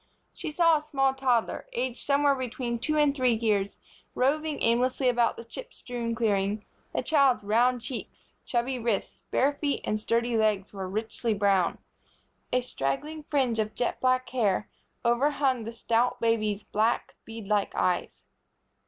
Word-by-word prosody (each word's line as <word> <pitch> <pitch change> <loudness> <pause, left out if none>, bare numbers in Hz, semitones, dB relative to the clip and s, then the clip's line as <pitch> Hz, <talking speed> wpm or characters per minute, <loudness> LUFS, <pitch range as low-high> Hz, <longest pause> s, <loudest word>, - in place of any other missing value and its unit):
She - - -5
saw 330 +1 +4
a - - -5
small 270 -3 +1
toddler, 255 -4 0
aged 250 0 -2
somewhere 285 0 +3
between 245 -2 -3
two 305 +6 0
and 295 -2 +3
three 255 -4 +3
years, 210 -3 0 0.4
roving 300 +4 +1
aimlessly 250 +3 +2
about 240 -1 +2
the - - -7
chip 475 - -10
strewn 235 -2 -4
clearing. 205 -2 0 0.3
The - - -1
child's 275 -8 +3
round 240 +4 +2
cheeks, 245 0 -8
chubby 250 +1 -1
wrists, 230 -4 -2
bare 280 +2 +2
feet 285 0 -2
and 215 - -1
sturdy 235 +2 0
legs 210 -3 +1
were 190 -2 -5
richly 220 +2 -2
brown. 195 -3 +2 0.7
A 250 - +2
straggling 255 - -3
fringe 255 -6 +1
of 215 0 -1
jet 245 - -2
black 255 0 +2
hair 215 -5 0 0.3
overhung 260 0 +2
the 230 - -4
stout 235 +1 0
baby's 215 -3 +1
black, 220 +3 0
beadlike 210 -2 -2
eyes. 180 -1 -1
240 Hz, 150 wpm, -28 LUFS, 215-265 Hz, 0.7 s, saw